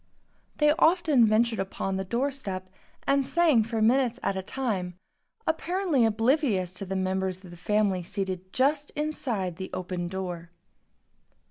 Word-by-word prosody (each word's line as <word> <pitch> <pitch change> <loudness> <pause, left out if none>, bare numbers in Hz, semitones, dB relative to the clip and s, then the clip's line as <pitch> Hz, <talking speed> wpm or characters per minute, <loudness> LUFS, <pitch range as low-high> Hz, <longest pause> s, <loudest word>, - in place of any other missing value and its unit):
They 300 0 +5
often 320 -9 +5
ventured 225 +1 +2
upon 195 0 -2
the 190 - -1
door 240 +8 0
step 185 -8 -6 0.3
and 275 0 +3
sang 315 -5 +3
for 225 0 -1
minutes 245 +1 +3
at 195 - 0
a 190 - -2
time, 190 -5 -3 0.5
apparently 330 -4 +1
oblivious 220 - +1
of 195 - -5
the 195 - -2
members 190 0 -1
of 180 - -11
the - - -10
family 200 +1 +1
seated 185 0 -4
just 285 +4 +1
inside 240 - -2
the 190 - -5
open 180 -1 -3
door. 175 -2 -5
215 Hz, 145 wpm, -27 LUFS, 185-270 Hz, 0.5 s, They